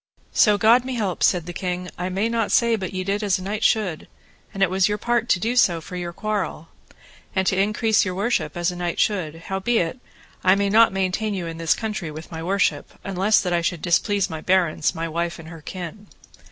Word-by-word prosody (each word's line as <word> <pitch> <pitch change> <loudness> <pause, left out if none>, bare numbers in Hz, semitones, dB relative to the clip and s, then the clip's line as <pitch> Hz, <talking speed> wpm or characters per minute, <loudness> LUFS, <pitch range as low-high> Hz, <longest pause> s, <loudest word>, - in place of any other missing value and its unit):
So 210 -2 +5
God 230 +4 +5
me 260 0 -4
help, 200 -6 -2
said 175 -3 +3
the 175 - -6
king, 180 0 -3
I 180 +1 -3
may 195 +4 0
not 230 -2 -1
say 235 -1 +4
but 190 -4 -4
ye 185 0 -3
did 200 +2 -1
as 200 -3 +1
a 185 - -8
knight 210 +3 -3
should, 195 -8 +1 0.4
and 195 - 0
it 190 - +3
was 190 +1 +2
your 210 - 0
part 235 +1 0
to 185 - +3
do 230 +6 -1
for 180 -6 +2
your 175 -1 -4
quarrel, 190 -4 -3 0.7
and 190 0 +1
to 190 - +2
increase 215 +2 +2
your 185 -2 -3
worship 205 -1 -1
as 175 +1 0
a - - -7
knight 175 -1 -3
should; 180 -7 0
howbeit 195 +2 0 0.4
I 185 +1 +5
may 200 0 0
not 225 0 +6
maintain 195 +3 -1
you 180 -3 -3
in 165 0 -6
this 165 -1 +2
country 215 -7 -4
with 155 +3 -9
my 160 -1 -5
worship, 175 -4 0
unless 195 +2 +2
that 180 -2 -1
I 170 - +2
should 170 -1 -2
displease 195 +3 +2
my 160 -1 -6
barons, 175 -4 +2
and - - -6
my 165 0 -3
wife 170 +1 -2
and 165 -1 -11
her 165 -2 -10
kin. 185 +5 -8
190 Hz, 225 wpm, -23 LUFS, 175-210 Hz, 0.7 s, not